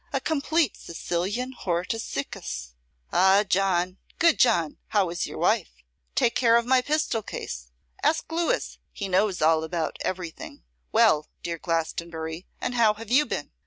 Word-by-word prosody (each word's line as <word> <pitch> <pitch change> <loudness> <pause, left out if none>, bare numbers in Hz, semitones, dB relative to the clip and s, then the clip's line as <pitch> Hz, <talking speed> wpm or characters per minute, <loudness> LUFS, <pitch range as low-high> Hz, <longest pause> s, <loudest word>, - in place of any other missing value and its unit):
a - - 0
complete 315 -2 +1
Sicilian 190 +9 -3
Hortus 185 +2 -2
Siccus. 65 - -5 0.4
Ah, 190 +2 +5
John, 185 -1 +1 0.2
good 335 -2 +4
John, 170 -10 +3
how 195 -5 +1
is 170 - -2
your - - -8
wife? - - +2 0.5
Take 235 - +3
care 235 -2 +4
of 235 - +1
my 255 +1 +4
pistol 295 -4 0
case. - - -6 0.3
Ask 320 0 +1
Louis; 340 +9 -1
he 200 - -4
knows 190 -1 +1
all 160 0 +4
about 160 0 -2
everything. 180 - -5 0.3
Well, 150 0 +4 0.2
dear 170 -1 -3
Glastonbury, 165 0 -3
and 250 - -2
how 225 -3 +4
have 225 +1 -9
you 295 +4 +5
been? - - -4
190 Hz, 150 wpm, -26 LUFS, 165-240 Hz, 0.5 s, Ah